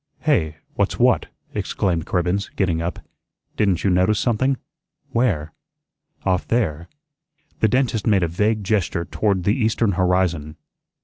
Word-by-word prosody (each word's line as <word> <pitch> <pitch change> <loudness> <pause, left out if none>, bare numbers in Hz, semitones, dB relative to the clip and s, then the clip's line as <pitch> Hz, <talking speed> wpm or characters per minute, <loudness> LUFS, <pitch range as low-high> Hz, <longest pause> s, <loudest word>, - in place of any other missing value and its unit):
"Hey? 80 - +1 0.2
What's - - 0
what?" - - +3 0.3
exclaimed 85 -4 -1
Cribbens, 90 +3 0
getting 85 -4 +1
up. 85 +1 -3 0.6
"Didn't 95 -5 +1
you 95 - +3
notice 95 +4 +3
something?" 130 +3 +1 0.5
"Where?" 85 -11 0 0.7
"Off 90 -2 +1
there." 85 -9 0 0.7
The 110 - +4
dentist 120 -2 +1
made 100 -4 +4
a - - +2
vague 105 +5 0
gesture 95 -4 0
toward 100 -2 0
the 100 - +3
eastern 110 -3 +1
horizon. 90 -4 0
95 Hz, 130 wpm, -22 LUFS, 85-110 Hz, 0.7 s, The